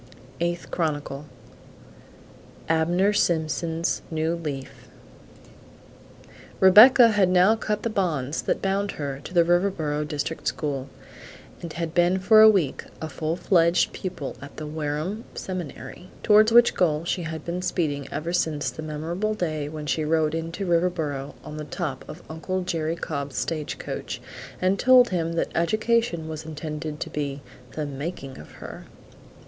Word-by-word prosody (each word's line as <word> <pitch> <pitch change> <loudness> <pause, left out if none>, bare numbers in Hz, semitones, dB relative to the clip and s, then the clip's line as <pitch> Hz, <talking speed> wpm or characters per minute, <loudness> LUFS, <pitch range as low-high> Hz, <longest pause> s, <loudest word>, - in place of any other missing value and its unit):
Eighth 175 0 -2
Chronicle. 145 -3 -2 1.4
ABNER 175 +5 +2
SIMPSON'S 165 -2 0
NEW 160 0 0
LEAF 150 -6 -6 1.7
Rebecca 230 +6 +9
had 205 -4 +3
now 185 +4 +5
cut 210 -1 -3
the 230 - 0
bonds 160 -8 -1
that - - -1
bound 195 +1 0
her 140 -2 -5
to - - -9
the 175 -2 +5
Riverboro 170 -4 +1
district 150 +2 -4
school, 140 -3 -2 0.7
and 170 -2 -6
had 165 -1 -4
been 175 +1 +3
for 215 +3 +6
a 220 - +10
week 185 -10 +1 0.2
a 160 - -4
full 155 +1 -3
fledged 170 -1 +3
pupil 180 -7 -5
at 140 +1 -11
the 155 - -5
Wareham 155 +7 -3
Seminary, 180 -2 -7
towards 215 +1 +6
which 240 +1 +6
goal 160 -2 +1
she 175 +1 -1
had 160 -2 -6
been 175 +1 -3
speeding 155 -6 -1
ever 160 +4 -3
since 160 -4 0
the - - -8
memorable 165 +8 -3
day 155 -6 -2
when 155 -1 -6
she 155 +1 0
rode 155 0 +1
into 165 +4 -3
Riverboro 165 -6 -1
on 150 - -8
the 155 - -4
top 150 -4 -4
of 155 +3 -9
Uncle 185 +4 -3
Jerry 165 -2 -1
Cobb's 140 -4 -4
stagecoach, 155 -3 -4 0.4
and 185 +2 +1
told 250 -1 +6
him 170 -2 -1
that 165 - -1
education 215 -1 +1
was 155 -1 -6
intended 150 -1 -6
to - - -3
be 140 -1 -4 0.3
"the 155 - -3
making 140 -1 -6
of 75 - -13
her." - - -10
165 Hz, 145 wpm, -25 LUFS, 150-185 Hz, 1.7 s, a